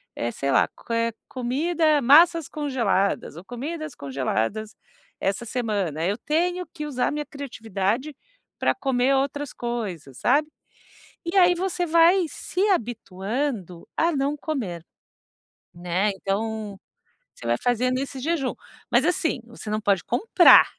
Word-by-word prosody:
eh, 120 0 -2
sei 140 - -3
lá, - - +4 0.2
eh, 230 0 +1
co 220 - -33 0.2
comida, 305 +4 +2
massas 325 +5 +6
congeladas 235 - 0
ou 175 - -9
comidas 305 +5 -5
congeladas 140 - -2 0.4
essa 200 +4 -1
semana, 200 - -1
eu 200 +3 0
tenho 355 +3 0
que 300 -3 -5
usar 260 -4 0
minha 295 0 -3
criatividade 245 -1 -3 0.4
para - - +2
comer 270 -4 +1
outras 280 +1 -1
coisas.", 200 - -5
sabe. 300 +1 +3 0.8
E 340 +3 -3
aí 355 -1 +7
você 355 0 -1
vai 335 +3 +5
se 375 +3 -2
habituando 220 - -2
a 335 +1 +3
não 280 +1 0
comer, 210 - -4 0.9
né, 180 +4 0
então, 205 0 -3 0.6
você 115 - -8
vai 120 +1 +2
fazendo 250 +1 +1
esse 275 -1 -5
jejum. 290 -2 -1 0.4
Mas, - - +4
assim, 320 -7 0
você 230 -2 -9
não 215 0 -1
pode 200 -4 +2
comprar. 355 - +7
245 Hz, 135 wpm, -24 LUFS, 200-305 Hz, 0.9 s, aí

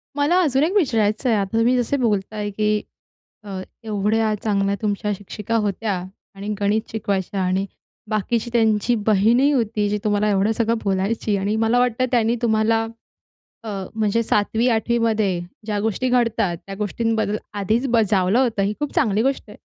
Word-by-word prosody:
मला 295 +5 +3
अजून 275 -3 +2
एक 350 +6 0
विचारायचं 230 - +1
आहे. 220 - +3
आता 195 +3 -2
तुम्ही 240 +3 +3
जसे 245 +3 0
बोलत 210 -5 0
आहे, 210 -1 -3
की 210 +1 0 0.6
अ, 195 -2 -5 0.2
एवढ्या 215 0 0
चांगल्या 200 -2 +1
तुमच्या 210 0 -1
शिक्षिका 210 +3 -4
होत्या 210 0 -1 0.4
आणि 200 +1 -7
गणित 205 +2 +2
शिकवायच्या 200 -3 -2
आणि 185 +1 0 0.5
बाकीची 220 +3 -1
त्यांची 225 0 +2
बहीणही 225 +7 +4
होती, 220 -5 0
जी 210 +1 -1
तुम्हाला 210 0 +1
एवढं 200 +2 +2
सगळं 230 +1 0
बोलायची 200 +2 0
आणि 200 +2 -1
मला 230 +2 +3
वाटतं 250 0 +1
त्यांनी 235 -1 +2
तुम्हाला 225 0 +2 0.8
अ, 225 - -8 0.3
म्हणजे 220 +1 +1
7वी, 220 +2 +1
8वी 235 0 +1
मध्ये 215 -6 +1 0.3
ज्या 210 -2 -1
गोष्टी 225 +4 -1
घडतात 230 -8 +1
त्या 195 - -6
गोष्टींबद्दल 220 0 -1 0.2
आधीच 220 +6 +1
बजावलं 210 -3 +2
होतं. 235 -6 +1
ही 200 - +1
खूप 295 - -2
चांगली 220 - +2
गोष्ट 270 +2 0
आहे. - - -12
220 Hz, 160 wpm, -22 LUFS, 205-235 Hz, 0.8 s, बहीणही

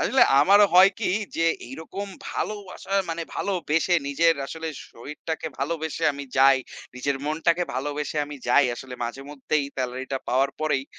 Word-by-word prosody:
আসলে 265 - +4 0.2
আমারও 200 +6 +6
হয় 190 +2 +8
কি - - -1 0.3
যে 165 - +2 0.2
এইরকম 160 +9 -7 0.2
ভালোবাসা 200 -2 -5 0.2
মানে 165 0 -3
ভালোবেসে 175 -2 0
নিজের 165 +3 +3
আসলে 160 +2 -5 0.2
শরীরটাকে 150 +6 -6
ভালোবেসে 160 +3 -2
আমি 140 0 -7
যাই, 135 0 +7 0.4
নিজের 135 +2 -1
মনটাকে 165 +3 +1
ভালোবেসে 145 +3 -3
আমি 150 - -8
যাই 145 +3 +5
আসলে 130 0 -8
মাঝেমধ্যেই 140 +4 -3
সেলারি 130 0 -3
টা 135 - 0
পাওয়ার 135 +3 +2
পরেই 145 -4 0
150 Hz, 140 wpm, -25 LUFS, 135-165 Hz, 0.4 s, হয়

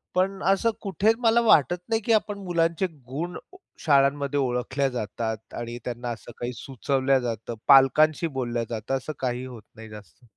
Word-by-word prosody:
पण 190 +1 0
असं 195 +4 +3
कुठे 205 +1 +2
मला 235 -1 +4
वाटत 175 - +4
नाही 225 0 +1
की 230 - +3
आपण 210 -1 +1
मुलांचे 170 +1 +1 0.2
गुण 170 +6 -4 0.2
ओ - - -13 0.2
शाळांमध्ये 140 -1 +2
ओळखल्या 135 +2 0
जातात 110 -2 -5
आणि 120 0 -5
त्यांना 120 0 -4
असं 115 - -7
काही 120 +1 -3
सुचवल्या 135 +2 0
जातं, 115 -1 -4
पालकांशी 150 +4 +5
बोलल्या 120 -2 -1
जातं. 115 +3 -2
असं 135 +4 -6
काही 125 -1 -2
होत 120 -4 -10
नाही 110 0 -11
जास्त. 105 -1 -14
135 Hz, 160 wpm, -25 LUFS, 120-170 Hz, 0.2 s, पालकांशी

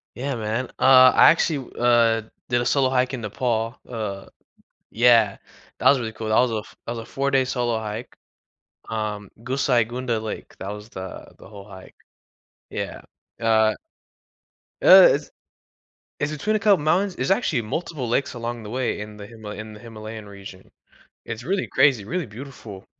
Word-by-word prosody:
Yeah 135 +2 -3
man, 115 +3 -2
uh, 130 -1 +8
I - - +7
actually, 155 -5 -1
w - - -20
uh, 115 -2 +3 0.2
did 120 -1 +1
a 120 - -2
solo 135 -2 +2
hike 130 0 +1
in 130 - -3
Nepal, 115 +1 -2
uh 105 -5 -6 0.6
Yeah, 115 -3 +4 0.4
that - - +4
was 140 - +5
really 115 -2 -4
cool 110 0 -6
that 110 - +1
was 125 -1 +3
a 110 - -1
f 105 - -11
that 115 - -4
was 120 - -6
a 115 - -7
4 140 +1 -1
day 135 -1 +2
solo 120 -2 -1
hike, 110 +2 -6 0.8
um, 105 -2 -4
Gosaikunda 125 -2 0
Lake, 110 - -7
that 95 - -6
was 105 +2 -8
the, 95 -3 -9
the - - -14
whole 100 -1 -11
hike, 95 -2 -13 0.7
yeah, - - -5 0.4
uh 110 -1 +3 1.1
Uh, - - +10
it's - - -4 0.9
It's 145 +1 -1
between 205 +9 -1
a 215 - +1
couple 205 -2 +5
of - - -6
mountains. 185 +5 +1
There's 130 - -1
actually 175 - +1
multiple 135 +3 -4
lakes 140 +4 0
along 120 -1 -5
the 105 - -8
way 125 0 -2
in 105 0 -8
the 100 - -9
Himal 110 -3 -9
in 110 0 -8
the 105 - -12
Himalayan 110 -1 -9
region. 100 -2 -12 0.5
It's 115 +1 -6
really 190 +7 -1
crazy, 125 -8 +3
really 180 - -2
beautiful, 115 -4 -10
115 Hz, 175 wpm, -23 LUFS, 110-130 Hz, 1.1 s, Uh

